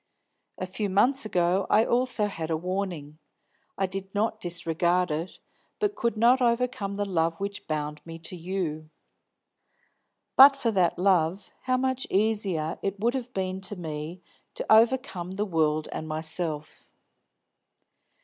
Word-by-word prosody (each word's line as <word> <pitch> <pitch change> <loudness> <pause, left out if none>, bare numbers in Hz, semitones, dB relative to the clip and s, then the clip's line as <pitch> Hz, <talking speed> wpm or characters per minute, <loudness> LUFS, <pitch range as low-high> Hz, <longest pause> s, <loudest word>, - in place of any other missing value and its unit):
A 185 - -3
few 200 +2 -3
months 240 +7 +3
ago 180 0 +1
I - - +5
had - - 0
also 240 -3 +1 0.2
a 160 - +1
warning. 175 -4 -4 0.6
I 195 - +1
did 195 +1 -4
not 220 +1 0
disregard 175 0 +1
it, 165 +4 -4 0.4
but 415 -1 +1
I - - -27
could 235 - -1
not 245 +4 +5
overcome 235 -4 0
the 205 0 -1
love 165 -3 0
which 200 +1 -5
bound 150 -1 -3
me 165 0 -8
to 165 +2 -5
you. 165 -3 -4 1.5
But 275 +1 +9
for 240 -4 0
that 185 -4 +2
love, 185 0 +1
how 255 -1 +2
much 260 0 -1
easier 195 -6 0
it 195 0 -3
would 235 +4 +1
have 250 -2 -4
been 190 -3 -3
to 195 +2 -3
me 160 0 -6 0.3
to - - -4
overcome 220 -6 +2
the 205 +2 -1
world 155 -4 +1
and 155 - -5
myself. 155 0 -4
190 Hz, 150 wpm, -27 LUFS, 165-220 Hz, 1.5 s, But